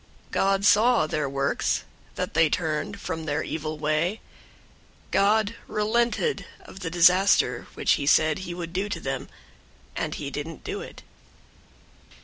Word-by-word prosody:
003:010 - - -27
God 195 0 +2
saw 225 -1 +5
their 150 -2 -2
works, 140 0 0 0.3
that - - -3
they 160 0 +4
turned 175 +6 -2
from 160 -4 -4
their 150 0 -1
evil 155 0 -4
way. 155 +7 0 0.9
God 210 +2 +3
relented 235 - 0
of 190 - -12
the 180 -4 -4
disaster 180 -7 +4
which - - +1
he 140 - -3
said 155 +3 +4
he 175 -2 -6
would 170 -1 -6
do 195 +3 -1
to 175 - -3
them, 135 -3 -4 0.7
and - - -2
he 140 -2 -5
didn't 150 +3 -6
do 410 +1 -4
it. 485 - -10
175 Hz, 145 wpm, -25 LUFS, 155-205 Hz, 0.9 s, saw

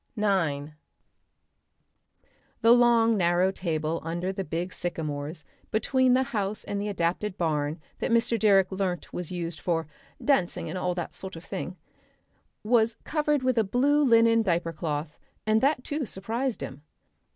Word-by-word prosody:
Section 215 - -4
9 155 -8 0 1.9
The 230 0 +6
long 235 -2 +5
narrow 175 +1 +3
table 165 -3 -2
under 170 +3 -2
the 195 - -3
big 175 +2 -3
sycamores 155 -2 -4 0.2
between 255 +3 +3
the 260 - +3
house 205 -1 -1
and 200 0 -3
the 205 - -2
adapted 190 +1 -1
barn 155 -2 -1 0.2
that - - -1
Mr. 230 0 +2
Direck 195 -3 +4
learnt 190 -2 -3
was 175 -1 -4
used 170 -2 -4
for 165 -2 -1 0.3
"dancing 180 -10 +1
and 175 - -4
all 180 -1 -1
that 175 - -4
sort 190 -2 -7
of 165 - -9
thing," - - -5 0.9
was 225 0 +3
covered 300 -2 0
with 255 -2 +2
a - - +4
blue 275 +8 +2
linen 230 -3 +5
diaper 170 -4 0
cloth, 150 -1 -4 0.3
and 215 0 +3
that 275 -2 +2
too 290 -3 -3
surprised 225 +7 -3
him. 135 +2 -7
190 Hz, 150 wpm, -27 LUFS, 170-230 Hz, 1.9 s, The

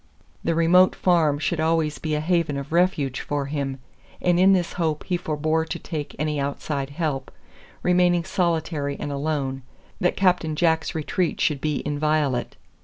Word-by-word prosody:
The 165 - +1
remote 180 +3 +5
farm 165 -5 +3
should 155 +2 -1
always 160 -1 +1
be 155 -1 -1
a 150 - -1
haven 165 -3 +1
of 140 +1 -6
refuge 165 -7 +1
for 145 -1 -2
him, 140 -2 -3 0.4
and 175 -1 +2
in 190 +1 +6
this 180 -3 0
hope 160 -3 -1
he 180 - -1
forbore 155 -1 0
to - - -3
take 155 -4 -6
any 150 0 -1
outside 140 0 -3
help, 140 -3 -3 0.5
remaining 180 -1 +3
solitary 160 -5 -1
and 145 - -4
alone, 140 -2 -2 0.4
that 180 - +1
Captain 180 -5 +2
Jack's 160 0 +1
retreat 160 +2 -1
should 145 -4 +1
be 150 -2 -1
inviolate. 150 -3 0
155 Hz, 160 wpm, -24 LUFS, 145-170 Hz, 0.5 s, in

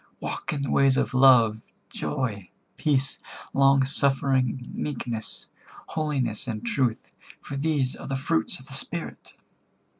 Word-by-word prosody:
Walk - - -4
in 145 -2 -2
the 135 - -2
ways 135 -1 +4
of - - 0
love, 120 -5 +6 0.3
joy, 110 -10 -3 0.3
peace, 140 -2 0 0.3
long 135 0 +5
suffering, 135 -2 +1
meekness, 120 -6 -5 0.4
holiness 140 -8 -2
and 110 -1 -4
truth, 120 -1 -1 0.2
for 140 - -7
these 140 -3 0
are - - -9
the 135 - -2
fruits 105 -9 0
of 130 - -13
the 140 - -10
Spirit." 165 +5 -5
135 Hz, 130 wpm, -26 LUFS, 120-140 Hz, 0.4 s, love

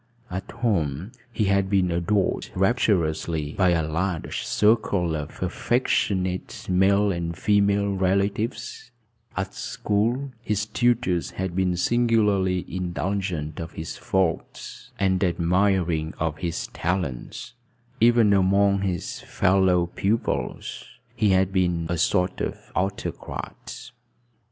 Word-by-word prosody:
At 95 +1 -5
home 95 - -1 0.2
he 110 - 0
had 100 -1 +2
been 95 -3 +2
adored 90 +3 0
rapturously 85 - +1
by 95 -2 +3
a 80 -3 +1
large 85 +2 -2
circle 100 -6 +2
of 75 +3 -5
affectionate 95 -2 -1
male 100 +2 +3
and 85 -2 -3
female 100 -1 +2
relatives; 100 +6 -1 0.5
at 95 0 -2
school 120 +7 -1
his 105 -2 -1
tutors 115 -6 +1
had 95 -2 -4
been 90 -2 +1
singularly 105 -4 +2
indulgent 90 -3 -3
of 85 0 -6
his 80 - -6
faults 95 -4 -2
and 95 -1 +1
admiring 85 -2 +1
of 80 -1 -2
his 85 -3 -2
talents; 90 - -3 0.5
even 115 -3 +5
among 100 +1 +3
his 90 -4 -3
fellow 95 -2 +2
pupils 100 +5 -2 0.3
he 110 -3 +2
had 95 0 +3
been 90 -3 +1
a 85 -1 -1
sort 90 +1 +1
of - - -2 0.2
autocrat. 100 +5 -4
95 Hz, 110 wpm, -25 LUFS, 85-100 Hz, 0.5 s, even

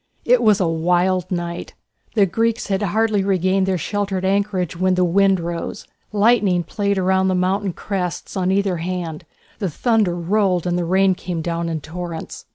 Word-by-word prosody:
It 245 0 +4
was 215 -3 +4
a 185 - +2
wild 175 +2 +1
night. 175 -1 -4 0.4
The 205 -3 +5
Greeks 225 +4 -1
had 195 0 0
hardly 210 +1 +1
regained 190 0 +1
their 190 -1 +1
sheltered 195 +1 -2
anchorage 195 -3 0
when 185 +1 +1
the 180 - +2
wind 195 +2 +3
rose, 170 +3 -5 0.3
lightning 205 -4 +3
played 200 +2 -1
round 190 0 +2
the 185 - +1
mountain 190 +2 0
crests 180 -2 -4
on 185 -1 0
either 195 -2 +1
hand, 170 -2 -4 0.3
the 195 -4 -1
thunder 215 - +1
rolled 180 0 +1
and 175 -1 0
the 175 -1 -1
rain 190 +2 +3
came 175 -2 -5
down 170 0 -2
in 160 -2 -3
torrents. 165 +1 -7
185 Hz, 170 wpm, -20 LUFS, 175-200 Hz, 0.4 s, The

